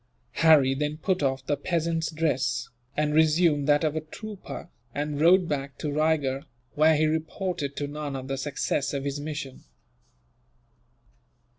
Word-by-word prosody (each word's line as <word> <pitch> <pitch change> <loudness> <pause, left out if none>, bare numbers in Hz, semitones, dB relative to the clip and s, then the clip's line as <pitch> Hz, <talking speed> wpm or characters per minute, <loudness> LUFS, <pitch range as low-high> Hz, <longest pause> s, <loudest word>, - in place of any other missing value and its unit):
Harry 150 -5 +6
then 150 +2 -2
put 185 +2 0
off 135 -1 0
the 145 - +1
peasant's 165 +1 -1
dress, 135 -6 -1 0.3
and 150 0 +1
resumed 155 -2 +3
that 145 +1 +4
of 155 -1 0
a 155 - -1
trooper, 205 +6 -8 0.3
and 145 0 -2
rode 175 +2 +6
back 140 -4 -3
to 150 - -3
Raygurh, 145 -2 +1 0.3
where 155 +1 +5
he 155 +1 +3
reported 160 -1 -2
to 145 - -3
Nana 145 -2 -5
the 135 +1 -3
success 140 0 -1
of 135 - -2
his 140 0 -3
mission. 145 -3 -6
150 Hz, 145 wpm, -27 LUFS, 140-160 Hz, 0.3 s, Harry